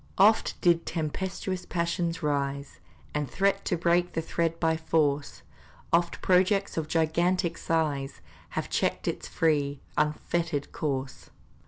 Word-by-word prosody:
Oft 215 Hz, +3 st, +4 dB
did 170 Hz, -1 st, +3 dB
tempestuous 185 Hz, +3 st, -3 dB
passions 170 Hz, -1 st, -1 dB
rise, 140 Hz, -1 st, -2 dB, 0.3 s
And 150 Hz, -3 st, -1 dB
threat 195 Hz, +5 st, +1 dB
to 175 Hz, -, 0 dB
break 175 Hz, +1 st, +2 dB
the 165 Hz, -, 0 dB
thread 165 Hz, 0 st, -1 dB
by 160 Hz, -1 st, +2 dB
force; 150 Hz, -3 st, 0 dB, 0.5 s
Oft 170 Hz, 0 st, +2 dB
projects 190 Hz, +2 st, +3 dB
of 160 Hz, -2 st, -2 dB
gigantic 170 Hz, +2 st, +1 dB
size 150 Hz, -5 st, -1 dB, 0.4 s
Have -, -, -1 dB
checked -, -, -1 dB
its -, -, -2 dB
free, 145 Hz, -3 st, +1 dB, 0.2 s
unfettered 150 Hz, 0 st, -1 dB
course. 135 Hz, -4 st, -3 dB
165 Hz, 125 wpm, -28 LUFS, 150-175 Hz, 0.5 s, Oft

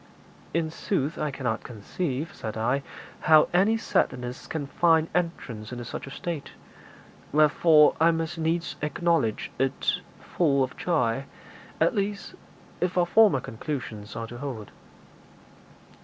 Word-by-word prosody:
'In 160 Hz, 0 st, -1 dB
sooth, 160 Hz, -3 st, -2 dB
I 150 Hz, -, 0 dB
cannot 125 Hz, -5 st, -3 dB
conceive,' 135 Hz, -, -4 dB
said 110 Hz, 0 st, -6 dB
I, 125 Hz, +5 st, +1 dB, 0.4 s
'how 155 Hz, -1 st, +5 dB
any 200 Hz, +5 st, +4 dB
sadness 125 Hz, -, -1 dB
can 155 Hz, -3 st, -3 dB
find 160 Hz, +2 st, +3 dB
entrance 135 Hz, -11 st, -3 dB
into 120 Hz, -1 st, -6 dB
such 115 Hz, -, -6 dB
a -, -, -6 dB
state; 160 Hz, +1 st, -5 dB, 0.8 s
wherefore 150 Hz, +1 st, +5 dB
I 165 Hz, -, +6 dB
must 165 Hz, 0 st, -1 dB
needs 165 Hz, +1 st, -1 dB
acknowledge 150 Hz, -6 st, 0 dB
it 135 Hz, 0 st, 0 dB, 0.2 s
full 140 Hz, -6 st, +1 dB
of 130 Hz, -, -4 dB
joy 135 Hz, -7 st, 0 dB, 0.5 s
at -, -, +3 dB
least, 200 Hz, -2 st, -2 dB, 0.5 s
if 180 Hz, 0 st, -1 dB
our 175 Hz, -, +4 dB
former 200 Hz, -, +5 dB
conclusions 110 Hz, -5 st, -6 dB
are 115 Hz, 0 st, -4 dB
to 120 Hz, +1 st, -9 dB
hold.' 120 Hz, -7 st, -6 dB
150 Hz, 130 wpm, -26 LUFS, 125-170 Hz, 0.8 s, I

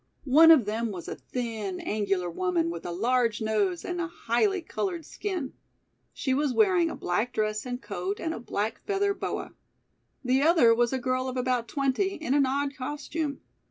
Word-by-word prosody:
One 310 Hz, +5 st, +7 dB
of 305 Hz, -9 st, +7 dB
them 225 Hz, +2 st, -1 dB
was 180 Hz, -5 st, -7 dB
a -, -, -4 dB
thin, 220 Hz, -6 st, -4 dB
angular 195 Hz, -4 st, -1 dB
woman 170 Hz, -1 st, 0 dB
with 170 Hz, 0 st, -6 dB
a -, -, -3 dB
large 230 Hz, +4 st, +1 dB
nose 210 Hz, -5 st, 0 dB
and 355 Hz, -1 st, -2 dB
a 340 Hz, -, -1 dB
highly 340 Hz, -, 0 dB
colored 345 Hz, -1 st, -3 dB
skin. 360 Hz, -10 st, -4 dB, 0.6 s
She 265 Hz, -, -1 dB
was 280 Hz, -1 st, 0 dB
wearing 370 Hz, -6 st, +4 dB
a -, -, -5 dB
black 210 Hz, +8 st, -1 dB
dress 215 Hz, +2 st, -1 dB
and 245 Hz, 0 st, -3 dB
coat 390 Hz, +8 st, -4 dB
and 320 Hz, -, -2 dB
a -, -, -6 dB
black 220 Hz, -1 st, -3 dB
feather 400 Hz, 0 st, 0 dB
boa. -, -, -4 dB, 0.7 s
The 260 Hz, +2 st, +3 dB
other 310 Hz, -7 st, +6 dB
was 235 Hz, +1 st, +2 dB
a 265 Hz, -, 0 dB
girl 255 Hz, 0 st, -1 dB
of 255 Hz, -, -5 dB
about 250 Hz, -2 st, 0 dB
twenty 280 Hz, -, 0 dB
in 310 Hz, -4 st, -2 dB
an 280 Hz, -2 st, +4 dB
odd 280 Hz, +1 st, -1 dB
costume. 290 Hz, +2 st, -4 dB
255 Hz, 185 wpm, -27 LUFS, 215-320 Hz, 0.7 s, One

